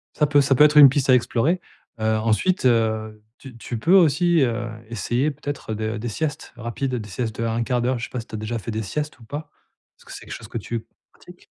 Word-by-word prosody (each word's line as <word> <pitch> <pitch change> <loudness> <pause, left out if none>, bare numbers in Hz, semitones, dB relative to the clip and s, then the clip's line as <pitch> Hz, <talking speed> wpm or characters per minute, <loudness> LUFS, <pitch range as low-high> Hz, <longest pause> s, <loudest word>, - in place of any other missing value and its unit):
Ça 150 - +2
peut 145 0 +4
ça 135 0 +2
peut 150 - +6
être 150 0 +5
une 145 -2 +11
piste 135 0 -1
à 130 - +8
explorer. 130 +8 +1 0.4
Heu, - - -4
ensuite, 115 - +1
heu, 110 -3 +1 0.2
tu 130 -4 -12
tu 115 +1 -5
peux 165 +11 +2
aussi, 175 -1 +4
heu, 120 -2 0 0.2
essayer 120 +5 -1
peut-être 145 -5 -6
de 110 +1 -3
des 120 +2 -4
siestes 150 +5 -4
rapides, 125 +3 -3
des 110 -3 -6
siestes 110 +2 -4
de 115 - 0
1/4. 120 +2 0
Je 120 - -4
sais - - -13
pas 125 - -4
si 115 - -9
tu - - -8
as - - -3
déjà 110 +2 -4
fait 115 - -6
des 110 +1 -3
siestes 150 +8 -4
ou - - -15
pas? 145 +7 -7 0.5
Est-ce - - -22
que - - -13
c'est - - -9
quelque - - -7
chose 110 - -10
que - - -4
tu 115 +1 -5 0.3
pratiques? - - -17
120 Hz, 245 wpm, -23 LUFS, 115-145 Hz, 0.5 s, une